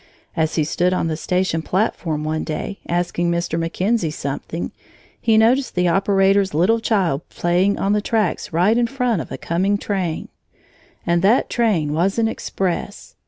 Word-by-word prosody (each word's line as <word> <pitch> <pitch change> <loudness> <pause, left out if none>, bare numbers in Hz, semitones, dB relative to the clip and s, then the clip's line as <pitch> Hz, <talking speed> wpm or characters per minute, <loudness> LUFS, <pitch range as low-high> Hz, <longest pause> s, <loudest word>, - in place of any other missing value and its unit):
As 160 -2 0
he 155 - +2
stood 175 +4 +1
on 165 - 0
the 160 - -1
station 180 0 0
platform 170 -5 -1
one 155 +1 -2
day, 195 +5 -4
asking 175 0 0
Mr. 170 -1 -1
McKenzie 180 +2 0
something, 150 +3 -4 0.5
he 225 -2 +3
noticed 250 +5 +3
the 180 0 +2
operator's 195 0 +2
little 200 +8 +3
child 190 -10 +1
playing 180 +4 +1
on 200 +1 +1
the 210 - +1
tracks 210 -4 -1
right 190 +8 +3
in 240 - +2
front 250 -7 0
of - - -9
a - - -4
coming 190 +5 0
train. 190 -6 -3 0.8
And 170 0 +2
that 210 +7 +3
train 190 -11 +1
was 180 +6 +1
an 225 -1 +2
express! 195 -2 -3
185 Hz, 165 wpm, -20 LUFS, 165-210 Hz, 0.8 s, he